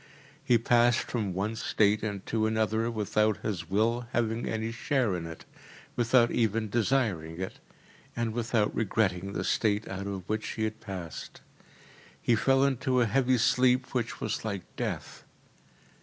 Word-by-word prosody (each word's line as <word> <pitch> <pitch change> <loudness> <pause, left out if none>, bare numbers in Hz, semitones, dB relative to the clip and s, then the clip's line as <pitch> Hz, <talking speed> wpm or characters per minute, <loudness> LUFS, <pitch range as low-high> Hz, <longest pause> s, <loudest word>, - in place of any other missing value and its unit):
He 120 - +4
passed 120 +1 +4
from 110 -6 -2
one 105 +4 -1
state 105 -1 +2
into 110 +1 -1
another 110 +1 +1
without 105 -1 0
his 90 -6 -3
will 115 +4 +1
having 115 0 0
any 110 0 -2
share 115 -3 0
in 85 -2 -4
it, 80 -1 -10 0.5
without 120 0 +4
even 110 -2 0
desiring 105 -9 0
it, 95 - -5 0.6
and 115 -2 -1
without 115 -2 0
regretting 100 -3 0
the - - -2
state 105 -1 +1
out 100 0 -5
of 95 -2 -5
which 110 0 -2
he 110 - -3
had 110 0 -3
passed. 95 -5 -7 0.8
He 120 - +2
fell 135 +4 +3
into 130 -1 +1
a 120 - +4
heavy 130 +2 +2
sleep 125 +2 +3
which 120 -3 -2
was 110 - -2
like 100 -5 -3
death. - - -4
110 Hz, 150 wpm, -29 LUFS, 100-120 Hz, 0.8 s, He